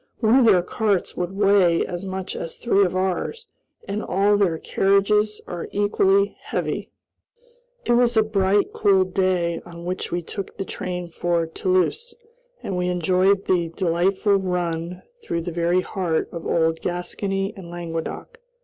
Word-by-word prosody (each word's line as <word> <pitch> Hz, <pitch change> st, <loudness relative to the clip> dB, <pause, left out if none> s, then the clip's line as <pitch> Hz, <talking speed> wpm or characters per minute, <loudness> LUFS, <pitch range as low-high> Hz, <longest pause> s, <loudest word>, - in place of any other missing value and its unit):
One 230 Hz, +3 st, +4 dB
of 250 Hz, -, +4 dB
their 190 Hz, -6 st, +5 dB
carts 200 Hz, -1 st, -1 dB
would 180 Hz, +1 st, -3 dB
weigh 195 Hz, -4 st, +4 dB
as 175 Hz, +2 st, -5 dB
much 190 Hz, 0 st, -4 dB
as 165 Hz, -, -5 dB
three 200 Hz, -4 st, +3 dB
of 185 Hz, -1 st, 0 dB
ours, 190 Hz, -, -2 dB, 0.4 s
and 205 Hz, +2 st, -2 dB
all 200 Hz, +2 st, +2 dB
their 190 Hz, -5 st, +2 dB
carriages 210 Hz, +4 st, +2 dB
are 175 Hz, -1 st, -6 dB
equally 200 Hz, -1 st, +2 dB
heavy. -, -, -3 dB, 1.0 s
It -, -, +1 dB
was 240 Hz, -1 st, +3 dB
a 220 Hz, -, +6 dB
bright, 200 Hz, -1 st, +1 dB
cool 195 Hz, -2 st, +4 dB
day 185 Hz, -2 st, 0 dB
on 170 Hz, 0 st, -10 dB
which 180 Hz, +1 st, -3 dB
we 175 Hz, 0 st, -2 dB
took 195 Hz, +3 st, -7 dB
the 195 Hz, -, -3 dB
train 180 Hz, -2 st, -5 dB
for 170 Hz, 0 st, 0 dB
Toulouse, 185 Hz, -, -1 dB, 0.5 s
and 190 Hz, -, -3 dB
we 180 Hz, 0 st, 0 dB
enjoyed 185 Hz, +3 st, +2 dB
the 175 Hz, -3 st, +1 dB
delightful 185 Hz, +4 st, +1 dB
run 180 Hz, -2 st, -3 dB, 0.2 s
through 170 Hz, -, -2 dB
the 175 Hz, -, -4 dB
very 170 Hz, +2 st, +1 dB
heart 180 Hz, -4 st, -2 dB
of 170 Hz, -1 st, -6 dB
old 165 Hz, -1 st, +1 dB
Gascony 195 Hz, +3 st, -2 dB
and 185 Hz, -3 st, -10 dB
Languedoc. 170 Hz, -, -6 dB
185 Hz, 155 wpm, -23 LUFS, 175-200 Hz, 1.0 s, a